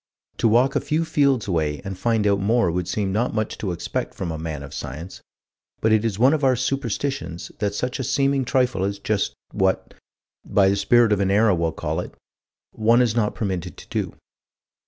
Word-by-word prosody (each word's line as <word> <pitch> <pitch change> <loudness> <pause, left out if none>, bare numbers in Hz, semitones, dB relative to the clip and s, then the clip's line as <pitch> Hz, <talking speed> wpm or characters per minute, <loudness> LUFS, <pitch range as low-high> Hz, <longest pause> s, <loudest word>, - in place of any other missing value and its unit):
To - - +2
walk 120 +5 +3
a - - +2
few 160 +2 0
fields 140 -8 +2
away 80 -5 0
and 95 -1 -4
find 110 +2 0
out 100 -1 +3
more 100 -2 +2
would 90 0 -2
seem 100 +1 -1
not 110 +2 0
much 110 -1 -1
to 100 - -2
expect 85 - -4
from 90 -3 -4
a 80 - -4
man 80 -3 -5
of 70 - -10
science, 80 +8 -7 0.6
but 110 - +2
it 110 0 +4
is 110 -4 -1
one 130 +6 +5
of 150 -2 -1
our 130 -1 +4
superstitions, 130 -6 -3
that 100 -2 -1
such 125 +4 -2
a - - -1
seeming 135 +2 +1
trifle 125 -6 +1
is 100 +1 -1
just 100 0 -1 0.2
what 95 0 0 0.5
by 95 -1 +3
the 100 - +2
Spirit 110 +3 +4
of 100 - 0
an 95 -1 +1
Era, 105 +1 +4
we'll 85 -2 0
call 80 +1 -3
it - - -6 0.6
one 115 +2 +3
is 120 -3 +2
not 110 -3 +1
permitted 95 -4 -3
to - - -12
do. - - -3
105 Hz, 205 wpm, -23 LUFS, 95-120 Hz, 0.6 s, one